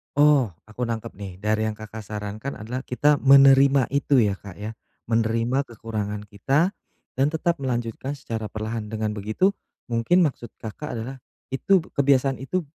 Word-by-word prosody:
Oh, 145 -3 +5 0.2
aku 115 +3 -4
nangkep, 115 -2 -4
nih, 100 -3 -8
dari 110 +1 +1
yang 110 - -3
Kakak 110 +1 -9
sarankan 105 +4 -5
adalah 115 +5 -5
kita 145 +4 +3
menerima 135 0 +7
itu, 140 0 +2
ya, 100 -2 0
Kak, 100 -3 -10
ya? 105 +2 -5 0.4
Menerima 115 +4 +1
kekurangan 105 -3 -4
kita 135 - +1 0.5
dan 135 - +4
tetap 165 +1 0
melanjutkan 125 +1 -3
secara 115 -5 -5
perlahan, 110 +1 -4
dengan 110 0 -2
begitu 110 - +1 0.4
mungkin 145 +11 +3
maksud 130 -6 -3
Kakak 115 +7 -6
adalah 125 +4 -6 0.3
itu, 180 +7 +3
kebiasaan 135 -1 +2
itu 170 +8 -2
115 Hz, 150 wpm, -24 LUFS, 110-140 Hz, 0.5 s, menerima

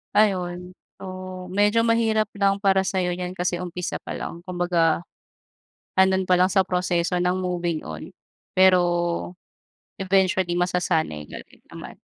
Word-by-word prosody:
Ayun. 180 -3 +1 0.2
So, 185 -1 -7
medyo 205 +5 +2
mahirap 225 -1 +2
lang 200 0 +2
para 195 -1 +3
sa'yo 185 -2 -1
'yan 180 0 -4
kasi 180 -1 -2
umpisa 180 0 -4
pa - - -7
lang. 170 +1 -6
Kumbaga, 175 -3 +1 1.0
ando'n 190 0 +3
pa 185 - +4
lang 185 +1 +4
sa 190 0 +4
proseso 180 -1 0
ng 180 +1 +1
moving 175 -3 -2
on. 80 -1 -8 0.4
Pero, 185 -1 +6 1.2
eventually 190 -2 +1
masasanay 175 - 0
ka - - -7
rin - - -23
naman. - - -9
185 Hz, 135 wpm, -24 LUFS, 175-190 Hz, 1.2 s, Pero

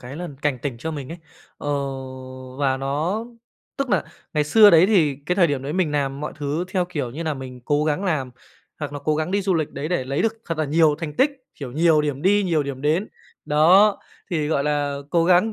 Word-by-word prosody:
cái 125 +3 -9
lần 170 -4 -7
cảnh 145 -4 0
tỉnh 130 -1 -4
cho 160 +7 -4
mình 145 -4 -6
ấy. 170 - -9 0.4
Ờ, - - -5 0.9
và 135 -2 +1
nó 150 +11 -2 0.5
tức 275 -1 -2
nà - - +2 0.3
ngày 150 -1 +2
xưa 205 +8 +7
đấy, 170 +1 +6
thì 165 -10 +3
cái 180 - 0
thời 180 -3 +5
điểm 140 -4 -2
đấy 140 +2 -4
mình 180 -3 +1
làm 140 -1 -1
mọi 150 - -4
thứ 150 +3 -2
theo, 185 -2 0
kiểu 150 -8 -4
như 150 +7 -5
nà, 155 -2 -1
mình 130 -2 -8
cố 145 +2 +1
gắng 155 +5 0
làm, 150 -9 -1 0.5
hoặc 145 -2 -5
là 145 - -4
cố 155 - +2
gắng 155 +2 -2
đi 200 +1 +1
du 190 -1 +1
lịch 155 -3 -1
đấy 140 +3 -5
để 175 -7 -1
lấy 135 +2 -1
được 225 - +2
thật 165 -2 -3
là 155 - +1
nhiều 155 +1 +3
thành 160 -3 -5
tích, 285 - +4 0.2
kiểu, 135 -4 -7
nhiều 160 +1 +4
điểm 145 -2 -3
đi, 205 +3 +4
nhiều 165 -5 +1
điểm 140 -2 -6
đến. 160 +8 +1 0.4
Đó, 185 +8 +5 0.3
thì, 155 -4 0
gọi 140 -3 +1
là, 145 -1 0
cố 170 -1 +3
gắng, 180 +5 +4
155 Hz, 235 wpm, -22 LUFS, 140-175 Hz, 0.9 s, xưa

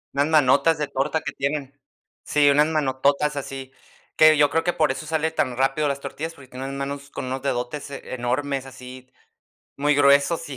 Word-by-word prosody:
Unas 140 +2 +2
manotas 150 +1 +4
de 150 -1 -2
torta 135 +4 -1
que - - -5
tienen. 140 0 -3 0.5
Sí, 145 -1 +3
unas 150 +2 +4
manototas 145 -1 +1
así, 135 -1 -7 0.4
que 155 -1 +6
yo 145 -1 +4
creo 165 +2 0
que 175 - +1
por 155 -4 +1
eso 155 - -8
sale 160 +1 0
tan 130 -6 -1
rápido 135 +3 +1
las 140 0 -2
tortillas, 160 +3 -6
porque 140 -5 -16
tiene 130 +1 -8
unas 135 0 -5
manos 140 +1 -5
con - - -6
unos 130 +1 -4
dedotes 135 +2 -3
enormes, 135 +1 -3
así, 130 0 -12 0.7
muy 145 0 +2
gruesos 140 +3 +3
y 135 - -7
140 Hz, 185 wpm, -23 LUFS, 135-150 Hz, 0.7 s, que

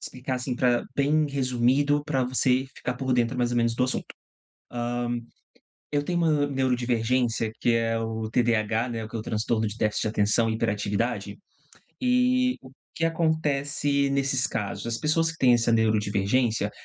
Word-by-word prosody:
Explicar 130 0 -4
assim 125 0 -3
pra 120 -1 +2
bem 150 +2 +2
resumido 135 +2 +1
pra 135 -4 0
você 130 +1 +1
ficar 125 - -3
por 130 0 -2
dentro 120 0 +1
mais 120 -1 0
ou 120 - -1
menos 115 -1 +2
do 125 - 0
assunto. 130 - -1
Hã, - - -11 1.9
eu - - -3
tenho 175 +2 -2
uma 155 -4 +2
neurodivergência 125 -3 0
que 120 - +3
é 115 0 +1
o 110 -1 -3
TDAH, 115 0 +1
né, 115 -2 -4
que 110 - -10
é - - -2
o - - -4
transtorno 110 0 -1
de 105 +1 -4
déficit 105 -2 0
de - - 0
atenção 110 +2 +2
e 110 - -1
hiperatividade, 105 0 -2 0.6
e 255 0 +2
o 130 - -13 0.2
que 165 - -1
acontece 145 -3 0
nesses 135 -1 +1
casos? 105 +1 -4
As 115 -1 -1
pessoas 165 +3 +1
que 165 - -10
têm 125 -2 +5
essa 120 -1 +2
neurodivergência, 110 0 +1
125 Hz, 165 wpm, -26 LUFS, 115-140 Hz, 1.9 s, têm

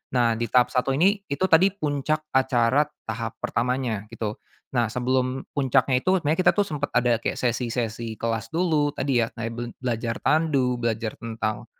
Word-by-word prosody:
Nah, 115 -2 +2
di 120 - -1
tahap 125 +2 +3
1 135 +1 +1
ini, 195 +7 +3
itu 140 +6 -2
tadi 170 +4 +7
puncak 155 -2 -2
acara 130 +1 +3 0.2
tahap 110 0 -3
pertamanya, 120 -3 -1
gitu. 110 -2 -4 0.4
Nah, 120 -2 +2
sebelum 130 +2 0
puncaknya 130 -1 +2
itu, 190 +1 +3
sebenarnya 155 +3 0
kita - - +7
tuh 205 -1 +2
sempet 150 -3 -3
ada 120 -2 +3
kayak - - -2
sesi-sesi 115 -2 -2
kelas 115 -1 -2
dulu 160 -4 +2
tadi 135 -4 +1
ya, 115 - 0
kayak 115 -1 -4
be 120 - -4 0.2
belajar 115 -2 -2
tandu, 140 -6 +2
belajar 115 -1 -1
tentang 110 -2 -4
125 Hz, 170 wpm, -25 LUFS, 115-145 Hz, 0.4 s, tadi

